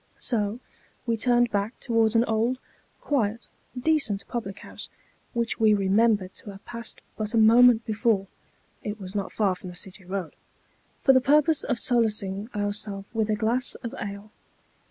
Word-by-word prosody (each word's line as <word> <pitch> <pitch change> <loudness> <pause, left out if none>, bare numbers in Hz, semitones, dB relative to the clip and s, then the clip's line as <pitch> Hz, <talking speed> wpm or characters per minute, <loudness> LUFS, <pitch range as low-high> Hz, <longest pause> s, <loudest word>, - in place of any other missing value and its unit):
So, 215 -1 -1 0.5
we 230 -2 +1
turned 240 +1 +2
back 205 +3 -2
towards 225 -1 +1
an 230 +1 +4
old, 225 +3 +1 0.4
quiet, 235 -5 -1 0.3
decent 255 -8 +1
public 200 -5 -4
house, - - -9 0.4
which 235 -1 -1
we 215 -2 +5
remembered 200 0 +2
to - - -11
have 195 0 -11
passed 235 -1 -8 0.2
but 215 +1 -2
a - - +3
moment 230 +1 +6
before 220 -3 +1 0.6
(it 210 0 -5
was 190 -1 -7
not 200 -2 -3
far 200 -4 +1
from 185 0 -9
the 180 - -10
City 190 +2 -6
Eoad), 185 -2 -4 0.7
for 270 - +6
the 260 - +5
purpose 300 +3 +4
of 245 - -1
solacing 215 -4 +1
ourself 205 -1 -3
with 220 -2 0
a 215 - +2
glass 235 +4 0
of 235 - -5
ale. 200 +1 -6
220 Hz, 160 wpm, -26 LUFS, 200-235 Hz, 0.7 s, moment